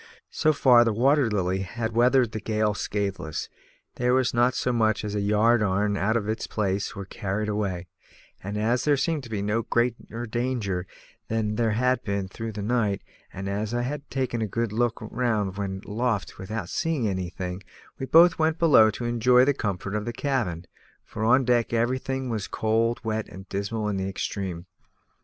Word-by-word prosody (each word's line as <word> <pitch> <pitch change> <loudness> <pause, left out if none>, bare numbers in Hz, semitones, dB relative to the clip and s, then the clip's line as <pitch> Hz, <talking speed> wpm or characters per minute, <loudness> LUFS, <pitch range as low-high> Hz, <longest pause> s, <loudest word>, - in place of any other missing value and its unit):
So 155 - +2
far 125 -5 +6
the 115 - +1
Water 135 +3 +3
Lily 95 -2 0
had 115 +4 -3
weathered 125 0 +4
the 110 - -4
gale 110 0 0
scatheless; 100 -6 -3 0.5
there 125 +1 +2
was 130 -2 +2
not 120 +1 +3
so 125 - 0
much 110 -2 +1
as 105 - -3
a 105 - 0
ropeyarn 105 -1 +2
out 110 +4 +1
of 105 -3 -3
its 110 +1 -2
place 100 -1 -1
or 100 -1 -6
carried 100 +2 -3
away; 100 -4 -2 0.6
and 100 +2 -4
as 115 +4 +1
there 145 -2 +3
seemed 155 +2 0
to - - -10
be 105 -3 -2
no 105 +3 0
greater 120 0 -1
danger 115 -6 -2 0.4
than 110 -1 -1
there 115 -1 +1
had 125 +3 +1
been 100 -1 -2
through 115 +4 -6
the 105 -1 -5
night, 110 -3 0 0.3
and 95 +1 -6
as 105 +3 -2
I 120 - 0
had 145 +3 -5
taken 130 -4 -2
a 110 - 0
good 115 +2 -2
look 120 0 +1
round 110 -4 -1
when 95 -1 -4
aloft 110 0 -2
without 95 -1 -5
seeing 160 -9 0
anything, 90 -1 -4 0.4
we 130 - -3
both 170 +3 +6
went 160 0 +2
below 150 -10 +6
to 115 +3 -5
enjoy 125 +2 +4
the 145 - +3
comfort 100 -5 -3
of 105 0 -2
the 120 - -3
cabin, 115 - -2 0.4
for 110 - -5
on 130 +4 +4
deck 120 -1 +2
everything 130 +3 0
was 110 -5 -3
cold, 115 +2 0
wet, 110 -1 -2
and 95 +1 -11
dismal 105 +2 -2
in 105 -2 -1
the 95 0 -2
extreme. 95 -3 -4
110 Hz, 185 wpm, -26 LUFS, 100-120 Hz, 0.6 s, far